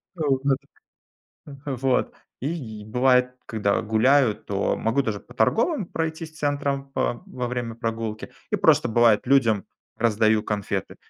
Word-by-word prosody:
Вот, 140 -5 0 1.3
вот. 130 -2 0 0.3
И 125 -9 -4
бывает, 125 +2 +2
когда 105 -1 0
гуляю, 115 +2 +3
то 100 -2 -2
могу 115 +5 +1
даже 105 -5 -3
по - - -16
торговым 230 - +1
пройтись 160 -1 -4
центрам 140 -2 -1
по 120 -3 -2
во 125 -10 -4
время 120 -2 -4
прогулки. 115 -2 -4 0.2
И - - +1
просто - - +4
бывает, 115 -2 +4
людям 115 -7 +3 0.3
раздаю 110 -1 +2
конфеты. 105 -2 -3
125 Hz, 125 wpm, -24 LUFS, 110-140 Hz, 1.3 s, просто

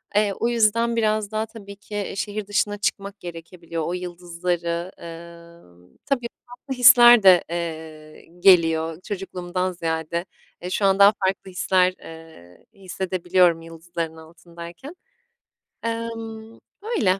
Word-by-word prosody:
Eee, 205 -1 +2
o 235 - +1
yüzden 230 0 +2
biraz 215 -2 0
daha, 215 0 -1
tabii 205 -3 -12
ki, 205 0 -6
şehir 205 0 -4
dışına 205 0 0
çıkmak 200 0 -3
gerekebiliyor. 170 -1 -7
O 175 - -3
yıldızları, 175 0 -3
ııı 170 - -13 0.2
Tabii, 245 -4 -1 0.2
farklı 245 +2 -8
hisler 240 -2 +8
de, 185 -3 +7
eee, 160 -2 -7
geliyor 165 -3 +4
çocukluğumdan 185 -2 -4
ziyade. 165 0 -3 0.4
Eee, 180 - -5
şu 195 +2 0
an 195 0 +3
daha 200 +1 +8
farklı 190 0 -2
hisler, 185 0 +2
eee, 160 - -14
hissedebiliyorum 180 -2 0
yıldızların 165 0 -6
altındayken. 170 - -12 0.9
Emm, 225 -1 -5 0.2
öyle. 365 - 0
180 Hz, 120 wpm, -23 LUFS, 170-210 Hz, 0.9 s, hisler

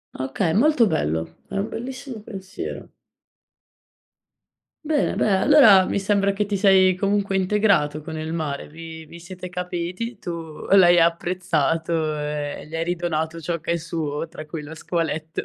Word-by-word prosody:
Okay, 135 +6 -1
molto 250 - +4
bello. 80 - -2
È - - -8
un 200 +3 -1
bellissimo 255 0 -6
pensiero. 190 -3 -7 2.0
Bene 300 -2 +1
dai 195 -3 +2
allora 220 -11 +7
mi - - -1
sembra 200 0 +1
che 205 +1 -1
ti 205 0 -1
sei 190 -2 +5
comunque 200 0 0
integrato 190 -6 +2
con 160 +1 -7
il 155 +1 -4
mare, 150 -4 -3
vi 160 +1 -10
vi 170 +2 -12
siete 180 +1 -9
capiti, 180 +5 -4
tu 165 -3 -7
l'hai 175 -3 +7
apprezzato 165 -2 0
e 150 0 -4
gli 160 - -7
hai 165 - 0
ridonato 165 -2 -2
ciò 165 +1 -3
che 170 - -2
è - - +2
suo 160 -2 -4
tra 160 -2 -9
cui 155 0 -6
lo 150 +2 -9
squaletto. 160 -1 -3
170 Hz, 150 wpm, -23 LUFS, 160-195 Hz, 2.0 s, allora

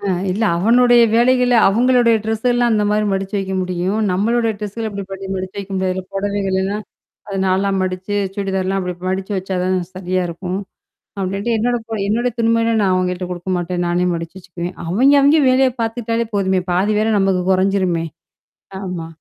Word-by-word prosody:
அ - - -9 0.3
இல்ல 210 +5 0
அவனுடைய 240 +5 +5
வேலைகள 250 +1 +3
அவுங்களுடைய 240 +2 +3
ட்ரெஸ்ஸலாம் 240 +2 +1
அந்த 210 -1 +2
மாரி 210 0 +1
மடிச்சு 195 +1 -3
வைக்க 190 -1 -3
முடியும். 185 +3 -2
நம்மளுடைய 225 +4 +1
ட்ரெஸ்கள 215 +2 -4
அப்படி 200 -1 -5
பண்ணி 195 0 -6
மடிச்சு 185 0 -5
வைக்க 200 0 -7
முடியாதுல்ல 185 0 -1
புடவைகள்லாம் 195 0 -1 0.5
அத 200 - -5
4ஆ 190 +2 +1
மடிச்சு 185 +2 -3 0.2
சுடிதார்லாம் 195 -1 -1
அப்படி 180 -1 -4
மடிச்சு 190 +2 -3
வச்சா 190 0 -3
தான் 185 0 +1 0.2
சரியா 185 0 -2
இருக்கும். 180 +2 -4 0.6
அப்டின்ட்டு 195 +5 -1
என்னோடய 240 +2 0
புட 225 -1 -4
என்னோட 235 +4 +1
துணிமணியலாம் 230 -1 +2
நான் 190 -2 +2
அவய்ங்கள்ட்ட 180 0 -1
குடுக்க 180 +1 -5
மாட்டேன். 175 0 -2
நானே 175 +1 +1
மடிச்சு 165 +2 -6
வச்சுக்குவேன். 175 -1 -7
அவய்ங்க 255 +12 +4
அவய்ங்க 290 +3 +5
வேலைய 260 0 +4
பாத்துக்ட்டாலே 230 0 -2
போதுமே! 190 -1 +1
பாதி 195 +4 +1
வேல 220 0 +2
நமக்கு 195 -2 +1
கொறஞ்சிருமே. 185 -3 +1 0.8
ஆமா. 180 -4 -5
195 Hz, 160 wpm, -18 LUFS, 185-225 Hz, 0.8 s, அவனுடைய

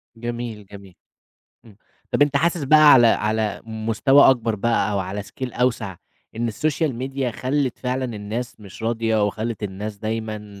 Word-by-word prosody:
جميل، 120 -2 -6
جميل. 100 -2 -13 0.7
إمم، 105 -4 -17 0.4
طَب - - +4
أنت 145 -1 +2
حاسس 170 +2 +1
بقى 155 +1 +7
على 120 -3 +7
على 110 -1 0
مستوى 115 +6 +4
أكبر 115 -3 0
بقى 110 0 0
أو 100 - 0
على 95 +2 -4
Scale - - -18 0.2
أوسَع، 115 -6 0 0.4
إن 115 0 -1
الSocial 155 +5 -1
Media 135 0 -2
خلّت 130 -1 -1
فعلًا 130 +1 -2
الناس 115 +1 -5
مش 100 +1 -12
راضية 115 -2 +1
وخلّت 110 +2 -4
الناس 105 +1 -5
دايمًا 110 -2 -5
115 Hz, 155 wpm, -22 LUFS, 105-130 Hz, 0.7 s, بقى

